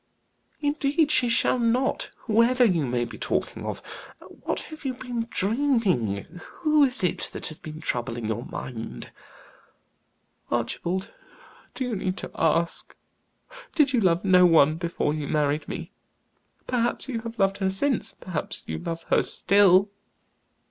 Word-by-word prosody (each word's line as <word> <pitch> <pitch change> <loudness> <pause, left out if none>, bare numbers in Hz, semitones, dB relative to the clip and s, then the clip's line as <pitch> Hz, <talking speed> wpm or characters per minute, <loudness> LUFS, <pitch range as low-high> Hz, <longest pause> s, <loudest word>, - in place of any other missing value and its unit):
"Indeed 295 +1 +1
she 245 -4 +4
shall 235 +2 +2
not 240 +3 0 0.2
whoever 240 +3 +4
you 170 - +1
may 120 0 0
be - - -10
talking - - -2
of. - - -5 0.4
What - - -5
have 310 0 -10
you 260 -2 -2
been 245 -2 -4
dreaming? 195 - 0 0.2
Who 305 -2 +5
is 255 -6 +7
it 180 - 0
that - - -6
has 155 - -9
been 155 0 -9
troubling 120 -4 -3
your 110 +2 -2
mind?" 115 - -7 1.4
"Archibald, 170 +10 -2 0.6
do 265 - -2
you 250 -3 -2
need 185 -1 -2
to - - -6
ask? 165 +1 0 0.8
Did 285 -4 +3
you 245 - +3
love 180 -1 +2
no 185 -1 +6
one 160 -3 +5
before 170 -3 -1
you 150 -2 -4
married 150 0 0
me? - - -6 0.7
Perhaps 240 +1 -1
you 245 -4 -3
have 230 +1 -8
loved 195 0 +1
her 190 -1 +1
since 245 +7 -1
perhaps 170 -5 -5
you 80 0 -4
love 165 - -5
her - - +5
still?" 200 0 +4
190 Hz, 145 wpm, -25 LUFS, 155-245 Hz, 1.4 s, is